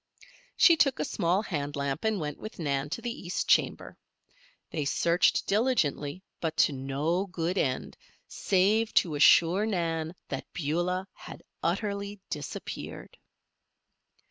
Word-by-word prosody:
She 335 - +7
took 275 -4 +3
a - - 0
small 185 +2 0
hand 145 -7 -3
lamp 140 +5 -2
and 220 -2 +1
went 150 -2 -4
with 215 - -8
Nan 140 -3 -1
to 165 - -5
the 240 -1 -4
east 180 - -2
chamber. - - +1 0.7
They 155 - -2
searched 170 +5 +2
diligently, 190 - 0 0.2
but 160 -1 -3
to 145 - +4
no 145 +8 -1
good 175 -1 -2
end, 130 -9 -1 0.3
save 210 +4 +2
to 165 - +3
assure 170 +7 +5
Nan 165 -4 -2
that 135 - -5
Beulah 175 +5 -1
had - - -11 0.2
utterly 200 +3 -2
disappeared. - - -6
170 Hz, 130 wpm, -28 LUFS, 150-200 Hz, 0.7 s, She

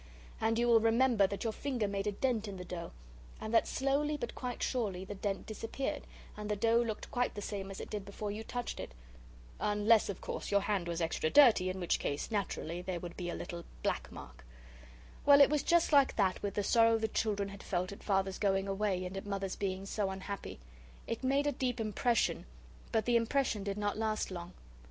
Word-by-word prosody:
And 225 +1 +1
you 240 +1 +2
will 230 -1 +7
remember 225 -2 +4
that 200 0 -4
your 225 -2 -1
finger 250 -4 -1
made 200 0 -2
a - - +2
dent 225 0 0
in 195 -2 -6
the 180 - -7
dough, 175 -1 -6 0.5
and 220 +1 -5
that 225 - +4
slowly, 285 +3 0
but 240 -5 -4
quite 250 -2 -4
surely, 200 -7 -1
the 205 - -6
dent 195 0 -3
disappeared, 225 +5 -4 0.3
and 210 0 -6
the 210 - +1
dough 230 +3 +3
looked 225 -3 -4
quite 245 0 0
the 205 - -4
same 195 -2 -4
as 195 - -7
it - - -7
did 210 -2 -3
before 200 +1 -5
you 215 +2 -5
touched 245 +1 -4
it. 65 - -7 0.6
Unless, 210 +1 +3
of 195 - -4
course, - - -5
your 200 0 +3
hand 200 -3 -1
was 170 0 -2
extra 165 -1 0
dirty, 225 - +6
in 185 +1 -4
which 175 - +1
case, 145 +9 -3
naturally, 180 -5 -2
there 180 -1 -3
would 175 0 -7
be 175 -1 -4
a - - -3
little 170 0 -6 0.2
black - - -1
mark. 60 +1 -11 0.8
Well, 285 0 +8
it 280 0 +7
was 300 -2 +2
just 340 +1 +3
like 280 -2 +5
that 190 -3 +1
with 200 -1 -3
the 205 - 0
sorrow 230 +1 +5
the 220 0 0
children 205 -2 -1
had 200 0 -10
felt 185 0 -2
at 200 - -9
Father's 195 -1 0
going 195 -1 +1
away, 195 -2 0
and 180 +1 -6
at 195 +1 -5
Mother's 195 -1 -2
being 195 -1 -3
so 200 0 -1
unhappy. 190 - -6 0.5
It 230 - -4
made 275 +2 +2
a 290 - +2
deep 250 -2 -2
impression, 225 - +1 0.4
but 220 - +1
the 240 -1 +4
impression 230 -2 0
did 200 0 -3
not 205 0 -1
last 215 -2 -1
long. 175 -1 -6
205 Hz, 215 wpm, -33 LUFS, 195-230 Hz, 0.8 s, Well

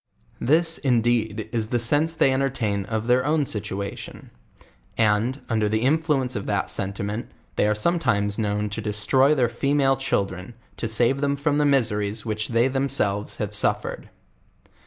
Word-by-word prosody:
This, 165 +5 +2
indeed 115 -4 0
is 110 -2 -1
the 120 - 0
sense 145 +8 +2
they 140 -5 +3
entertain 120 -7 -1
of 110 +1 -3
their 125 +1 +3
own 150 +1 +1
situation; 100 -3 -6 0.7
and, 110 +4 +1
under 110 -3 0
the 110 +1 0
influence 140 -3 +1
of 100 - -4
that 100 -2 0
sentiment, 100 +3 -2 0.3
they - - +2
are 105 - +1
sometimes 105 -7 0
known 105 -1 -1
to 110 - -4
cbstroy 110 +7 +2
their 125 -4 +2
female 135 +3 +1
children, 100 -5 -3 0.2
to 115 - -2
save 120 +5 +2
them 140 0 +1
from 145 +1 0
the 150 - +2
mis 135 -6 +3
eries 105 +1 -3
which 110 -1 -2
they 115 +1 +2
themselves 135 -7 0
have 105 -1 -4
suffered. 105 - 0
115 Hz, 155 wpm, -23 LUFS, 105-135 Hz, 0.7 s, they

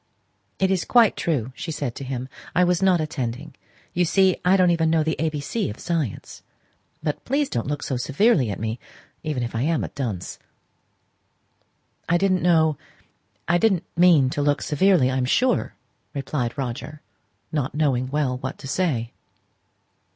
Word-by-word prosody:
"It 190 0 +2
is 190 -2 +1
quite 235 -4 +4
true!" 130 -7 -1
she 165 - -5
said 140 -5 -3
to 140 - -7
him. 130 -1 -4 0.3
"I 180 - +5
was 180 0 +2
not 190 -2 +4
attending: 140 -1 -4 0.4
you 180 - +2
see 190 +2 +3
I 185 +2 +4
don't 180 -1 +4
know - - +4
even 165 -1 +1
the 160 -1 +1
A 160 - +2
B 150 -1 -4
C 210 +10 -2
of 105 - -7
science. 160 - -3 0.6
But, 150 - -2
please, 280 +2 0
don't 120 - -2
look 145 0 -3
so 130 - -2
severely 140 - +2
at 100 - -4
me, 110 +2 -3 0.4
even 150 -6 -2
if 120 - -4
I 115 - -1
am 160 +3 +1
a - - -4
dunce!" 110 -11 -5 1.7
"I 175 - +4
didn't 185 0 +2
know 160 -4 +3 0.7
I 175 +1 +3
didn't 190 -4 +2
mean 165 -7 +5
to 145 - -2
look 145 0 +1
severely, 150 -4 +3
I 130 - -1
am 130 - +1
sure," 250 - +1 0.4
replied 135 -3 -2
he, 130 -1 -4 0.6
not 145 -3 -2
knowing 135 -5 +1
well 135 -3 -1
what 130 +1 -5
to - - -9
say. 130 -8 -1
150 Hz, 175 wpm, -23 LUFS, 130-175 Hz, 1.7 s, I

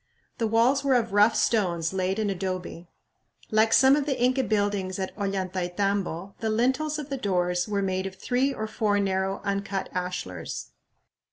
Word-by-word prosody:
The 225 - +1
walls 240 +5 +3
were 275 -2 +3
of 230 -4 0
rough 210 +2 +5
stones 175 -6 +1
laid 190 +1 0
in 215 -2 0
adobe. 185 -2 -5 0.6
Like 220 +1 +4
some 265 +3 +6
of 295 -1 -1
the 275 - -1
Inca 255 +2 +2
buildings 205 -4 0
at 190 -1 -4
Ollantaytambo, 190 -1 -2
the 225 - -1
lintels 260 +7 +1
of 300 -2 -6
the 275 - -2
doors 180 -5 0
were 200 -1 -1
made 190 0 -1
of 190 - -8
three 250 +7 0
or 220 -5 -4
four 215 -1 0
narrow 195 0 -1
uncut 200 -1 -2
ashlars. 180 - -4
200 Hz, 165 wpm, -26 LUFS, 185-230 Hz, 0.6 s, some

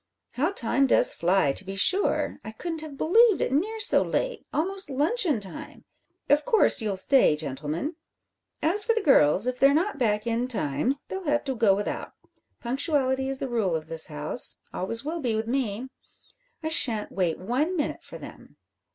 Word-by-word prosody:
How 295 +7 0
time 270 - +1
does - - +4
fly, 175 -5 +1
to 140 - -2
be 195 0 -7
sure! 375 - +1
I 220 - -8
couldn't 325 +6 -5
have 305 -3 -9
believed 440 - +4
it - - -1
near 410 +11 -1
so 425 - +3
late - - -3
almost 380 +3 -1
luncheon 300 - +1
time! 195 -3 -10 0.4
Of 295 +1 +3
course 450 - +3
you'll 205 -3 -2
stay, 250 - +3
gentlemen? 150 - -4 0.7
As 370 +7 +5
for 460 +1 +1
the 450 - -1
girls, 190 - +4
if 250 0 -2
they're 275 +1 +5
not 345 0 -1
back 210 -3 0
in 235 +1 -1
time 215 - -2
they'll 380 -1 -6
have 295 -1 0
to 270 - -3
go 220 -4 +3
without. 205 +1 -4 0.5
Punctuality 265 0 0
is 270 - +2
the 270 - -4
rule 220 -8 -1
of 160 0 -5
this 165 -1 -1
house 150 +8 -1 0.2
always 230 +8 -1
will 330 +3 -3
be 240 -7 -1
with 220 +1 -2
me. 245 -1 -3 0.7
I 315 - -2
shan't 230 -9 +1
wait 175 -4 -1
one 280 - -2
minute 295 - -3
for - - -10
them." - - -13
260 Hz, 180 wpm, -25 LUFS, 205-315 Hz, 0.7 s, As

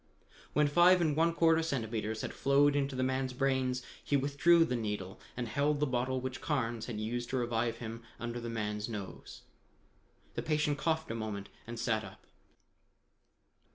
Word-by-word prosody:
When 150 - +4
five 175 +5 +6
and 155 -4 +2
one 165 +2 +3
quarter 165 -1 +4
centimeters 110 -7 -2
had - - -4
flowed 140 +1 +4
into 140 -1 0
the 130 - 0
man's 130 0 0
brains, 130 -1 0 0.2
he 145 - +2
withdrew 145 +5 +4
the 125 - -1
needle 105 -5 -3 0.2
and 120 -2 -2
held 140 +6 +1
the 150 - +3
bottle 130 0 0
which 130 0 -5
Carnes 120 -7 -1
had 115 -4 -4
used 120 +2 -3
to 130 - 0
revive 120 -1 0
him 115 0 -6 0.2
under 120 0 -4
the 120 0 -5
man's 105 -1 -2
nose. 100 -4 -7 0.9
The - - -2
patient 150 -2 0
coughed 160 -2 0
a - - -1
moment 110 -3 -4 0.2
and 120 0 -6
sat 110 -2 +1
up. - - -12
130 Hz, 170 wpm, -32 LUFS, 115-145 Hz, 0.9 s, five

